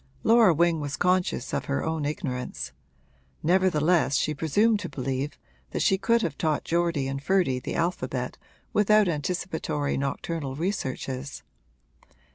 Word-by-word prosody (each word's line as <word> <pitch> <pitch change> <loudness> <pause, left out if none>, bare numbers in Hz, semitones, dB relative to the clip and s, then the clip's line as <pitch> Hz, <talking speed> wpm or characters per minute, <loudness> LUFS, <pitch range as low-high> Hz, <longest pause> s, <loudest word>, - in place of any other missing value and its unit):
Laura 225 -4 +6
Wing 170 0 +2
was 145 -1 -4
conscious 180 -7 +1
of - - -1
her 140 - -1
own 160 -2 -1
ignorance; 145 -5 -4 0.7
nevertheless 170 -4 +3
she 155 - +1
presumed 205 +10 +2
to 185 -4 -5
believe 135 +1 -3 0.3
that - - -1
she 195 - +4
could 230 +2 +2
have 150 -4 -3
taught 155 -3 0
Geordie 170 -5 0
and 135 0 -3
Ferdy 175 -6 +2
the - - -5
alphabet 170 +2 -2 0.4
without 210 0 +4
anticipatory 160 -2 -2
nocturnal 140 +1 -3
researches. 140 -5 -3
160 Hz, 130 wpm, -26 LUFS, 140-185 Hz, 0.7 s, Laura